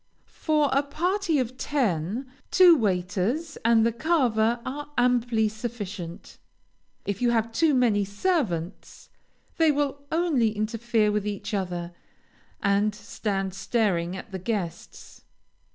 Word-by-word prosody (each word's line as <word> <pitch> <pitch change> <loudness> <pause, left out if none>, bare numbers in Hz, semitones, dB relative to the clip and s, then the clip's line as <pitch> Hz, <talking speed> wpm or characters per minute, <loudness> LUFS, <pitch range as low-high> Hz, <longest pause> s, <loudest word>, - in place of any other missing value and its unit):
For 300 -3 +2
a 275 - +4
party 345 +4 0
of 255 -1 -2
ten, 220 - -1 0.2
two 360 -2 +7
waiters, 200 - -1
and 230 0 +4
the 230 - +2
carver, 240 -5 +1
are 290 +3 -5
amply 245 -2 +2
sufficient. 210 -6 -7 0.7
If 200 +1 -3
you 245 - +3
have 230 -1 +1
too 300 +5 +2
many 225 -5 +3
servants, 200 - -2 0.5
they 320 -2 +5
will 285 -1 -1
only 280 -11 +1
interfere 220 0 +1
with 210 0 -1
each 205 +1 -4
other, 175 -3 -3 0.7
and 200 +1 +2
stand 200 -2 -3
staring 195 -4 0
at 195 - -10
the 190 - -4
guests. 185 -4 -5
225 Hz, 120 wpm, -26 LUFS, 200-275 Hz, 0.7 s, two